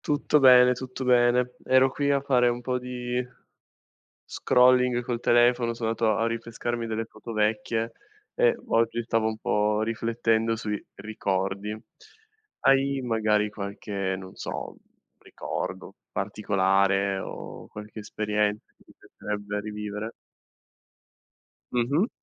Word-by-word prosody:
Tutto 150 0 +1
bene, 125 -1 +8
tutto 130 +1 -6
bene. 125 0 +3
Ero 130 0 +4
qui 145 +1 -1
a 140 -1 +3
fare 130 -3 +3
un 120 0 -3
po' 125 +1 -1
di 125 0 -3 1.0
scrolling 125 -1 +4
col 120 -1 -3
telefono, 120 0 +3
so' 115 0 -6
andato 110 0 +1
a 100 - -2
a - - +2
rinfrescarmi 115 0 -3
delle 115 0 -3
foto 115 - -10
vecchie, 110 +1 0 0.4
e - - +4
v - - -18
oggi, 115 +1 +2
stavo 115 -1 0
un 110 0 -2
po' 105 0 +1
riflettendo 115 0 0
sui 105 -2 -3 0.2
ricordi. 100 0 -2 0.9
Hai 135 0 +3
magari 110 -3 +1
qualche, 100 -2 -4
non 95 0 -10
so, - - -6 0.4
ricordo - - -6 0.2
particolare, 100 -1 +1
o - - -8
qualche 105 +1 -9
esperienza, 105 0 -1
che - - -25
ti - - -19
piacerebbe 105 0 -5
rivivere? 105 +1 -5 1.6
Mh-mh. 140 - +1
115 Hz, 125 wpm, -26 LUFS, 105-125 Hz, 1.6 s, bene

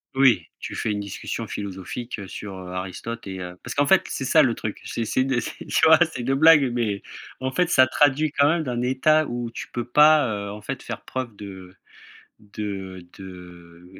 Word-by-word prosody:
Oui 125 -11 +4
tu - - -6
fais 110 - -1
une 105 - -2
discussion 100 +3 -5
philosophique 100 +5 -6
sur 100 +1 -7
Aristote 95 +5 -6
et 95 -1 -6
heu 90 0 -7
parce 125 - -5
qu'en 145 0 +2
fait, 190 - +5
c'est 135 - -3
ça 155 +4 +5
le 120 -4 +2
truc, 105 - -5
c'est 115 - -3
c'est 130 - 0
une 130 -2 +1
tu - - -1
vois, - - +8
c'est - - -5
une 130 +3 0
blague, 140 -3 +6
mais, 105 -5 -1 0.4
en 130 0 -2
fait, 180 +5 +1
ça 130 -7 +5
traduit 145 +2 +2
quand 140 0 +4
même 165 -1 +1
d'un 120 -3 -3
état 155 +5 +3
où 120 -1 -4
tu - - -8
peux 120 -1 -3
pas 125 -7 +4
en 105 +1 -9
fait - - -5
faire - - -6
preuve 130 -3 -5
de 95 -2 -10 0.7
de 95 -3 -7
de 90 -2 -12
115 Hz, 195 wpm, -24 LUFS, 95-135 Hz, 0.7 s, vois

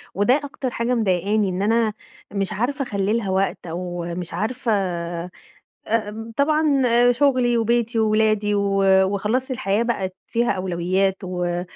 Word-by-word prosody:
وده 205 +6 +3
أكتر 275 -2 -4
حاجة 235 +2 -1
مضايقاني 205 -1 +1
إن 185 +1 -3
أنا 220 +1 +2 0.4
مش 195 -1 -2
عارفة 270 +7 -1
أخلي 200 -4 -1
لها 210 -4 -3
وقت، 190 -1 -1
أو 175 +1 -4
مش 175 -2 -6
عارفة 230 +6 -2 1.2
آآ، 225 0 -2
طبعًا 295 -1 +2 0.3
شغلي 250 -2 +2
وبيتي 230 +1 +1
وولادي 215 -1 +2
و 200 -1 +1 0.2
وخلاص 210 +7 -1
الحياة 230 -4 0
بقِت 190 -6 -2
فيها 235 0 0
أولويات 185 +1 0
و 180 -1 -2
215 Hz, 135 wpm, -22 LUFS, 190-240 Hz, 1.2 s, وده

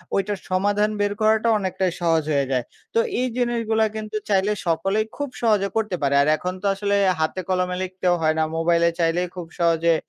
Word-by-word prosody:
ওইটার 200 +1 0
সমাধান 205 +3 +1
বের 205 0 +1
করাটা 220 +1 +3
অনেকটাই 185 -1 -1
সহজ 165 -2 +2
হয়ে 140 -1 +2
যায়। 125 -2 +1 0.3
তো 230 - +3 0.2
এই 255 - +1
জিনিসগুলো 230 -2 +1
কিন্তু 215 0 -6
চাইলে 195 +1 +2 0.2
সকলেই 195 +6 +1
খুব 285 -2 -3
সহজে 210 -4 +2
করতে 215 -4 0
পারে। 140 -1 +1
আর 140 - +2
এখন 180 0 -3
তো - - -7
আসলে 200 0 0 0.2
হাতে 160 +4 -1
কলমে 180 0 0
লিখতেও 185 -1 0
হয় 155 0 +2
না, 160 - +3
মোবাইলে 170 0 +3
চাইলেই 170 +2 +1
খুব 175 -2 -6
সহজে 165 0 +3
190 Hz, 185 wpm, -23 LUFS, 170-210 Hz, 0.3 s, করাটা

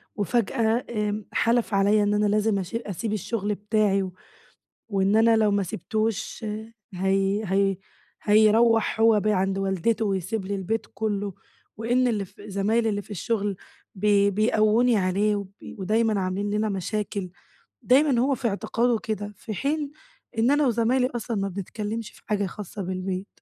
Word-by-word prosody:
وفجأة 225 +2 0
آمم 210 -2 -2
حلف 230 -2 +1
عليَّا 205 +2 +4
إن 205 0 +1
أنا 210 0 +2
لازم 210 0 +2
أشي 190 +5 -3
أسيب 210 +2 -3
الشغل 210 0 -2
بتاعي، 205 -2 +1 0.8
وإن 195 0 +2
أنا 225 +1 +5
لو 215 -1 +3
ما 200 -1 +1
سِبتوش 215 +5 -3 0.5
هي 195 +2 +1
هي 195 0 +1 0.5
هيروَّح 220 +1 +4
هو 225 -1 +5
بقى 215 +1 +1
عند 195 0 0
والدته 195 +3 0
ويسيب 195 +1 -2
لي 200 +1 -2
البيت 220 +3 -2
كله، 205 -1 -2 0.4
وإن 245 +3 +2
اللي 210 -4 0
ف 185 - -18
زمايلي 215 +3 0
اللي 205 -1 -1
في 210 - -16
الشغل 205 +1 -1 0.4
ب 200 +2 -4 0.3
بيقووني 220 +2 +3
عليه، 200 +2 +1
وب 200 -2 -5 0.3
ودايمًا 215 +2 +1
عاملين 190 +2 -2
لنا 210 +1 0
مشاكل، 200 0 -3 0.5
دايمًا 270 -1 +4
هو 270 +2 +2
في 245 - -2
اعتقاده 230 +3 0
كده 210 -1 -4
في 220 - -6
حين 285 - -2 0.5
إن 235 +5 +3
أنا 290 -1 +3
وزمايلي 245 +2 +2
أصلًا 230 -1 -3
ما 195 0 -1
بنتكلمش 210 +4 -5
في - - -19
حاجة 205 -1 0
خاصة 200 +2 -7
بالبيت، 185 +1 -3
210 Hz, 150 wpm, -25 LUFS, 195-225 Hz, 0.8 s, أنا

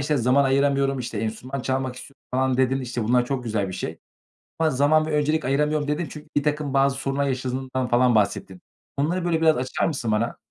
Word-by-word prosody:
işte, 150 +1 0
"Zaman 130 +3 +3
ayıramıyorum." 135 0 +2
işte, 115 -3 -4
"Enstrüman 115 +5 -4
çalmak 130 -1 -2
istiyorum." 140 - -13
falan 130 0 +1
dedin, 130 +1 +2
işte, 120 -3 -3
bunlar 125 +2 +3
çok 130 -1 -3
güzel 105 -4 -1
bir - - -6
şey 90 - -5 0.6
ama 160 - +3
"Zaman 150 +3 +3
ve 155 - -4
öncelik 150 0 +1
ayıramıyorum." 150 +2 +1
dedin 150 +4 -1
çünkü 150 - -10
birtakım 150 -1 0
bazı 135 0 +3
sorunlar 135 +1 -1
yaşadığından 130 0 -2
falan 120 -1 +3
bahsettin. 100 -3 0 0.4
Onları, 170 +6 0
böyle, 165 -2 +1
biraz 160 -4 +4
açar 130 0 -1
mısın 130 -8 -2
bana? 105 +2 0
135 Hz, 195 wpm, -24 LUFS, 125-145 Hz, 0.6 s, biraz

